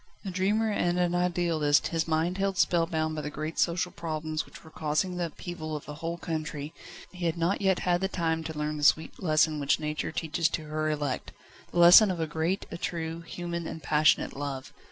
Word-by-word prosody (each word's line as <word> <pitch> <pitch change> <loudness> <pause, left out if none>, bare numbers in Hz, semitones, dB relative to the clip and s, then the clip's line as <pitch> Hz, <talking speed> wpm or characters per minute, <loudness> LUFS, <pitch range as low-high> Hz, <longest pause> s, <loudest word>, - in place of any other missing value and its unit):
A 190 - -3
dreamer 205 +4 +1
and 175 -3 +1
an 175 -1 +1
idealist, 175 -4 +2
his 165 -1 -1
mind 165 +4 0
held 195 -1 0
spellbound 160 -3 +1
by 155 - -3
the 150 - -4
great 155 +2 -5
social 180 +1 +1
problems 155 -1 -3
which - - -14
were 160 - -14
causing 160 +5 -1
the 175 -1 0
upheaval 155 -1 -6
of 150 - -7
a 150 - -6
whole 165 +3 -4
country, 155 -2 -4 0.4
he 180 -2 -3
had 165 +1 -1
not 170 +5 0
yet 190 -2 +3
had 175 0 +1
the 190 - +1
time 165 -3 -1
to 160 -1 -5
learn 150 0 -2
the 150 - -5
sweet 155 +2 +3
lesson 155 -3 +2
which 140 +1 +2
Nature 150 0 -3
teaches 165 +1 0
to 160 - -3
her 155 0 -1
elect 145 -3 -2 0.4
the - - -5
lesson 175 +5 +9
of 180 -2 -2
a 160 - +1
great, 160 +5 -1
a 170 - -6
true, 165 -1 -3
human 170 0 -5
and 160 - -7
passionate 155 +1 +3
love. 140 -2 -5
165 Hz, 210 wpm, -28 LUFS, 155-175 Hz, 0.4 s, lesson